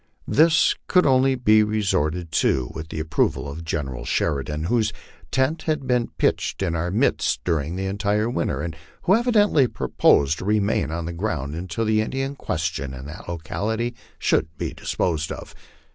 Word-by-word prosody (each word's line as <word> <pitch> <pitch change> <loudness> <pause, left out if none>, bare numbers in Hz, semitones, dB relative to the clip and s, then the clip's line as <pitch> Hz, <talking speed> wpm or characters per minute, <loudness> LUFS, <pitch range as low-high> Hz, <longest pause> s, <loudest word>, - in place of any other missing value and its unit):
This 160 +2 +4
could 180 - +4
only 135 -1 +4
be 110 -4 +5
resorted 90 -6 0
to 65 -5 +1
with 80 0 -7
the 80 - -5
approval 75 -3 0
of 75 +4 -6
General 75 -6 -3
Sheridan, 75 0 -1
whose 110 +4 +1 0.4
tent 130 - +1
had 155 -3 0
been 125 -2 +1
pitched - - 0
in 85 -3 0
our 85 +1 -1
midst 110 +9 +1
during 80 -1 -1
the 95 +1 -3
entire 100 +2 0
winter, 85 - -1
and 85 -1 -4 0.3
who 185 - +4
evidently 210 - +4
proposed 70 - +2
to - - -6
remain 105 -4 +1
on 80 +1 -3
the 85 - -4
ground 80 -7 -3
until 90 +6 -3
the 110 0 +3
Indian 135 +5 -2
question 80 - -3
in 65 +1 -9
that 80 +4 -9
locality 110 +8 -2 0.2
should 80 - +2
be - - -3
disposed 80 -3 -1
of. - - -8
95 Hz, 165 wpm, -23 LUFS, 80-120 Hz, 0.4 s, be